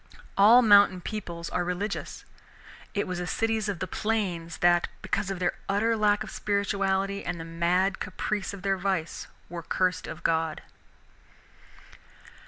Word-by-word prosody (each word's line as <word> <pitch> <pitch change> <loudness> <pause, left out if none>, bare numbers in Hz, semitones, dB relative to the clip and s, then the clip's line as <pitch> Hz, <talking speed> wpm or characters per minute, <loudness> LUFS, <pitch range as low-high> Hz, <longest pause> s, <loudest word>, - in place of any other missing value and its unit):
All 230 +5 +7
mountain 205 -3 +6
peoples 170 -4 -6
are 180 - 0
religious. 180 +4 -4 0.7
It 205 - +1
was 185 -1 -4
the 180 - -3
cities 220 +2 0
of 200 - -2
the 185 - -3
plains 185 -5 -2
that, 175 0 +3 0.2
because 195 +1 -1
of 195 - -3
their 175 0 0 0.2
utter 220 +4 +2
lack 210 -1 +2
of 215 - -9
spirituality 200 -1 0
and 175 -1 -4
the 165 - -6
mad 175 +3 +1
caprice 200 +2 -3
of 200 -2 -9
their 195 -1 +1
vice, 185 -4 -2 0.2
were 170 0 -6
cursed 185 0 0
of 165 - -8
God. 160 -1 0
190 Hz, 150 wpm, -27 LUFS, 175-205 Hz, 0.7 s, All